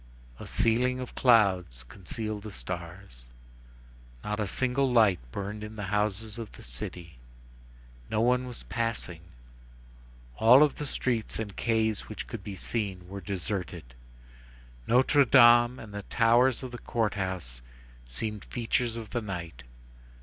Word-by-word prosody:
A -, -, -8 dB
ceiling 125 Hz, +3 st, +1 dB
of 125 Hz, -, -6 dB
clouds 95 Hz, -, +3 dB
concealed 105 Hz, -, -6 dB
the 110 Hz, -, -8 dB
stars. 85 Hz, -8 st, -8 dB, 1.0 s
Not 105 Hz, 0 st, -3 dB
a 105 Hz, -, 0 dB
single 130 Hz, +4 st, 0 dB
light 110 Hz, -6 st, +4 dB
burned 105 Hz, +4 st, -5 dB
in 105 Hz, +1 st, -8 dB
the 105 Hz, -, -5 dB
houses 105 Hz, +2 st, -1 dB
of 115 Hz, -2 st, -7 dB
the -, -, -12 dB
city; 80 Hz, +4 st, -6 dB, 0.9 s
no 110 Hz, -, 0 dB
one 125 Hz, +2 st, +2 dB
was 125 Hz, -, -5 dB
passing; 115 Hz, -8 st, -2 dB, 1.2 s
all 125 Hz, +6 st, +7 dB
of 150 Hz, -, +1 dB
the 150 Hz, -, -4 dB
streets 120 Hz, -4 st, -2 dB
and 105 Hz, -3 st, -5 dB
quays 110 Hz, -3 st, 0 dB
which 110 Hz, -, -6 dB
could 115 Hz, -5 st, -7 dB
be 100 Hz, -1 st, -6 dB
seen 95 Hz, -3 st, -3 dB
were 100 Hz, +1 st, -7 dB
deserted; 95 Hz, -, -4 dB, 0.9 s
Notre 130 Hz, +4 st, +5 dB
Dame 120 Hz, -1 st, +6 dB
and 110 Hz, -4 st, -10 dB
the 100 Hz, -, -4 dB
towers 120 Hz, +4 st, +3 dB
of 130 Hz, -, -6 dB
the 120 Hz, -, -7 dB
Court 115 Hz, -3 st, -1 dB
House 90 Hz, -11 st, -4 dB, 0.5 s
seemed 105 Hz, -, -5 dB
features 120 Hz, 0 st, -1 dB
of 115 Hz, -2 st, -7 dB
the 120 Hz, -, -1 dB
night. 85 Hz, -, -6 dB
110 Hz, 140 wpm, -28 LUFS, 95-120 Hz, 1.2 s, all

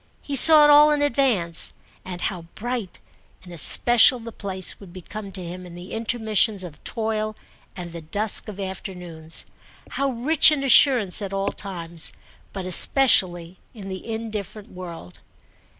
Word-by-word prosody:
He 285 Hz, -, -4 dB
saw 305 Hz, +3 st, +8 dB
it 295 Hz, -, +5 dB
all 295 Hz, +1 st, +6 dB
in 295 Hz, -1 st, 0 dB
advance, 235 Hz, -, 0 dB, 0.3 s
and 180 Hz, -1 st, -8 dB
how 175 Hz, -4 st, -4 dB
bright 240 Hz, -4 st, -6 dB, 0.5 s
in 180 Hz, -, -13 dB
especial 240 Hz, -, +5 dB
the 230 Hz, 0 st, -10 dB
place 190 Hz, -4 st, -5 dB
would 195 Hz, -4 st, -14 dB
become 195 Hz, +3 st, -10 dB
to 185 Hz, -1 st, -7 dB
him 180 Hz, +2 st, -8 dB
in 175 Hz, -1 st, -12 dB
the 175 Hz, +2 st, -10 dB
intermissions 220 Hz, -3 st, 0 dB
of 160 Hz, -5 st, -12 dB
toil 215 Hz, -1 st, -3 dB, 0.4 s
and 175 Hz, -3 st, -8 dB
the 170 Hz, 0 st, -9 dB
dusk 205 Hz, +9 st, -2 dB
of 205 Hz, -2 st, -9 dB
afternoons; 180 Hz, -4 st, -7 dB, 0.5 s
how 275 Hz, 0 st, -2 dB
rich 275 Hz, +6 st, +4 dB
in 290 Hz, -2 st, -2 dB
assurance 245 Hz, -7 st, +4 dB
at 195 Hz, -1 st, -6 dB
all 195 Hz, 0 st, -2 dB
times, 170 Hz, -4 st, -6 dB, 0.4 s
but 190 Hz, -2 st, -7 dB
especially 185 Hz, -4 st, +3 dB, 0.2 s
in 195 Hz, -3 st, -9 dB
the 190 Hz, +4 st, -7 dB
indifferent 215 Hz, -2 st, -7 dB
world. 170 Hz, -, -11 dB
200 Hz, 150 wpm, -22 LUFS, 180-235 Hz, 0.5 s, saw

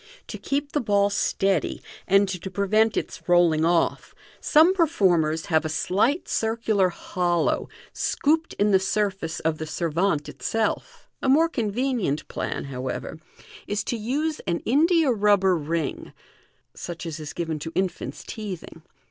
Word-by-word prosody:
To -, -, -6 dB
keep 285 Hz, 0 st, -2 dB
the 295 Hz, -, 0 dB
ball 205 Hz, -3 st, +2 dB
steady, 195 Hz, -3 st, 0 dB, 0.3 s
and 195 Hz, +1 st, +4 dB
to 190 Hz, 0 st, -5 dB
prevent 210 Hz, +3 st, +2 dB
its -, -, -4 dB
rolling 170 Hz, -3 st, +4 dB
off, 170 Hz, 0 st, +1 dB, 0.2 s
some 320 Hz, +5 st, +5 dB
performers 180 Hz, -, +2 dB
have 160 Hz, -2 st, +2 dB
a 155 Hz, -, -3 dB
slight 205 Hz, -, 0 dB
circular 220 Hz, -4 st, +1 dB
hcliow 175 Hz, -1 st, -1 dB, 0.2 s
scooped 320 Hz, +3 st, 0 dB
in 205 Hz, +1 st, +1 dB
the 190 Hz, -, +5 dB
surface 190 Hz, -4 st, -1 dB
of 155 Hz, -1 st, -1 dB
the 155 Hz, -, -3 dB
servavte 165 Hz, 0 st, 0 dB
itself. 220 Hz, -, -3 dB
A -, -, 0 dB
more 320 Hz, +5 st, +5 dB
convenient 230 Hz, -, -1 dB
plan, -, -, -4 dB
however, 130 Hz, +3 st, -5 dB, 0.5 s
is 205 Hz, 0 st, -1 dB
to -, -, -2 dB
use 290 Hz, +8 st, -2 dB
an 170 Hz, -1 st, 0 dB
india 315 Hz, +3 st, +3 dB
rubber 200 Hz, -4 st, +3 dB
ring 160 Hz, -1 st, -3 dB, 0.6 s
(such 170 Hz, 0 st, -7 dB
as 165 Hz, -1 st, -5 dB
is 150 Hz, -1 st, -6 dB
given 165 Hz, -3 st, -3 dB
to 160 Hz, +2 st, -6 dB
infanta 190 Hz, -1 st, -3 dB
teething). 195 Hz, -7 st, -7 dB
195 Hz, 140 wpm, -24 LUFS, 165-230 Hz, 0.6 s, some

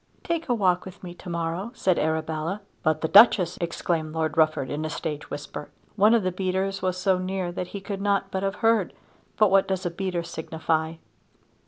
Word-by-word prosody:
"Take 335 Hz, -3 st, -2 dB
a 245 Hz, -, +3 dB
walk 185 Hz, -4 st, +2 dB
with 190 Hz, 0 st, -11 dB
me 175 Hz, -1 st, -7 dB
to 175 Hz, -, -11 dB
morrow," 170 Hz, +4 st, -2 dB
said 185 Hz, -6 st, +1 dB
Arabella. 160 Hz, +4 st, -2 dB, 0.2 s
"But 155 Hz, 0 st, +1 dB
the 160 Hz, -, +1 dB
Duchess?" 195 Hz, -3 st, +6 dB
exclaimed 165 Hz, -2 st, -2 dB
Lord 160 Hz, -2 st, -1 dB
Rufford 155 Hz, -4 st, +2 dB
in 150 Hz, +2 st, -2 dB
a 155 Hz, -, -2 dB
stage 150 Hz, -1 st, -5 dB
whisper. 145 Hz, 0 st, -7 dB, 0.3 s
One 215 Hz, +2 st, +5 dB
of 225 Hz, -, +2 dB
the 185 Hz, -, 0 dB
beaters 190 Hz, +1 st, -1 dB
was 185 Hz, -1 st, -1 dB
so 185 Hz, 0 st, +2 dB
near 185 Hz, -1 st, -2 dB
that 180 Hz, 0 st, -4 dB
he 200 Hz, -, -7 dB
could 200 Hz, 0 st, -5 dB
not 200 Hz, -1 st, 0 dB
but 190 Hz, -, -2 dB
have 195 Hz, 0 st, -1 dB
heard; 225 Hz, -5 st, +3 dB, 0.4 s
but 215 Hz, -3 st, +4 dB
what 195 Hz, 0 st, +4 dB
does 190 Hz, -1 st, -2 dB
a 175 Hz, -, -1 dB
beater 180 Hz, -1 st, -2 dB
signify? 160 Hz, -1 st, -2 dB
180 Hz, 200 wpm, -25 LUFS, 160-195 Hz, 0.4 s, Duchess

